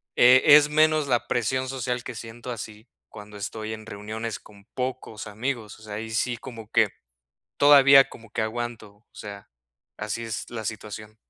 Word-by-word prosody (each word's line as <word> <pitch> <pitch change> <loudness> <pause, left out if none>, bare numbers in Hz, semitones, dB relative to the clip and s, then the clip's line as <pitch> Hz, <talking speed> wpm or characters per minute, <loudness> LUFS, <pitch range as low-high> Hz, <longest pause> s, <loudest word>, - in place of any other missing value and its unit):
eh, 125 +1 +7 0.2
es 150 -1 +4
menos 155 -1 +3
la 120 -2 0
presión 130 +3 -1
social 125 -2 -3
que 125 - -6
siento 115 +2 -8
así 110 0 -8 0.2
cuando 105 0 -11
estoy 110 +2 -5
en 110 0 -9
reuniones 110 0 -5
con 100 -1 -18
pocos 125 -3 -5
amigos, 110 0 -4
o - - -17
sea, 105 -1 -8
ahí 110 +1 -5
sí 120 +2 0
como 115 -3 -10
que - - +4 0.7
todavía 140 -1 +7
como 115 -2 -14
que 120 - -2
aguanto, 120 -1 -4
o 110 - -34
sea, 100 -1 -10 0.5
así 105 +2 -4
es 110 -1 -5
la 115 -2 -5
situación. 105 0 -7
115 Hz, 170 wpm, -25 LUFS, 110-125 Hz, 0.7 s, eh